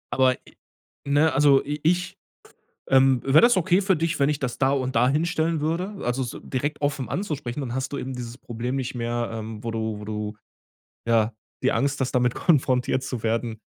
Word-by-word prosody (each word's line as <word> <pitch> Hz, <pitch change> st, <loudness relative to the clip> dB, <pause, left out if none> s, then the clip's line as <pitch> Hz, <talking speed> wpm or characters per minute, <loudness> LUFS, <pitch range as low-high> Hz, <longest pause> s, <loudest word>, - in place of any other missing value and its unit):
Aber 130 Hz, -1 st, +4 dB
e -, -, -16 dB, 0.5 s
ne, 145 Hz, +2 st, +3 dB
also 140 Hz, 0 st, +5 dB
i 150 Hz, +1 st, -4 dB
ich 180 Hz, +2 st, +1 dB, 0.7 s
ähm: 135 Hz, -1 st, +4 dB
„Wäre 135 Hz, +3 st, +6 dB
das 240 Hz, +1 st, +5 dB
okay 185 Hz, +1 st, +3 dB
für 190 Hz, -2 st, +2 dB
dich, 165 Hz, +1 st, -1 dB
wenn 140 Hz, 0 st, +3 dB
ich 150 Hz, -1 st, -1 dB
das 125 Hz, -3 st, -3 dB
da 135 Hz, 0 st, +3 dB
und 130 Hz, -3 st, -1 dB
da 120 Hz, +2 st, +4 dB
hinstellen 160 Hz, +2 st, 0 dB
würde?“ 170 Hz, +7 st, -2 dB
Also 125 Hz, +2 st, 0 dB
s 120 Hz, -, -5 dB
direkt 145 Hz, +3 st, -3 dB
offen 140 Hz, -2 st, -1 dB
anzusprechen, 150 Hz, -9 st, -3 dB
dann 125 Hz, -4 st, -4 dB
hast 130 Hz, +1 st, -3 dB
du 140 Hz, -, -3 dB
eben 130 Hz, +1 st, -5 dB
dieses 120 Hz, -1 st, -6 dB
Problem 120 Hz, +1 st, -4 dB
nicht 130 Hz, -2 st, -3 dB
mehr, 120 Hz, 0 st, -2 dB
ähm, 110 Hz, -1 st, -6 dB
wo 115 Hz, -, -2 dB
du 110 Hz, -2 st, -3 dB
wo -, -, -8 dB
du, 105 Hz, 0 st, -4 dB, 0.7 s
ja, 115 Hz, -1 st, +3 dB, 0.3 s
die 130 Hz, -, +3 dB
Angst 140 Hz, 0 st, 0 dB
hast, 130 Hz, -, -1 dB
damit 125 Hz, -1 st, +2 dB
konfrontiert 130 Hz, -5 st, +2 dB
zu 125 Hz, -4 st, -4 dB
werden, 115 Hz, -1 st, -1 dB
130 Hz, 200 wpm, -24 LUFS, 120-150 Hz, 0.7 s, Wäre